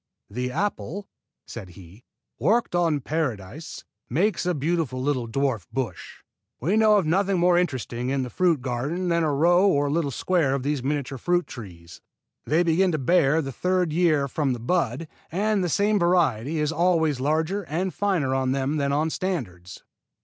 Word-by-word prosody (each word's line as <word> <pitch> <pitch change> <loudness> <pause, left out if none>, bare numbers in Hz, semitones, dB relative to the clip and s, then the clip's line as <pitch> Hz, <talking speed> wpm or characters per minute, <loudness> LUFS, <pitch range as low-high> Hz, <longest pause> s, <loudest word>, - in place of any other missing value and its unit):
"The 125 +3 -3
apple," 200 +4 -3 0.4
said 105 -6 -8
he, 95 +5 -15 0.3
"worked 230 -1 +1
on 170 -3 +2
the 145 - -3
Paradise, 140 - -4 0.3
makes 180 - 0
a 180 - +1
beautiful 150 -3 -1
little 130 -3 -1
dwarf 125 -4 -1
bush. 125 -10 -5 0.4
We 175 - 0
know 215 -1 +5
of 195 - +1
nothing 190 +4 +1
more 175 0 +4
interesting 130 -8 -1
in 135 -1 0
the 125 - -6
fruit 170 -8 +1
garden 140 +9 -2
than 170 0 +2
a 155 -2 +1
row 175 +7 +4
or 145 -6 +2
little 155 -2 0
square 150 -1 +1
of 135 - -3
these 145 -1 -1
miniature 135 -1 -3
fruit 175 +5 +1
trees. 85 -8 -11 0.4
They 160 +4 +2
begin 175 +3 +2
to - - +1
bear 160 +1 +3
the 135 - -5
third 180 +4 0
year 155 -5 +2
from 140 -1 -1
the 120 - -5
bud, 135 +2 -1 0.2
and 205 +2 +1
the 175 - -1
same 205 +5 +2
variety 165 - +1
is 150 0 0
always 160 -4 +2
larger 160 +8 0
and 175 +4 -2
finer 180 -10 0
on 130 -1 +1
them 135 +2 -1
than 140 -1 0
on 155 +3 0
standards." 95 - -4
155 Hz, 175 wpm, -25 LUFS, 130-175 Hz, 0.4 s, know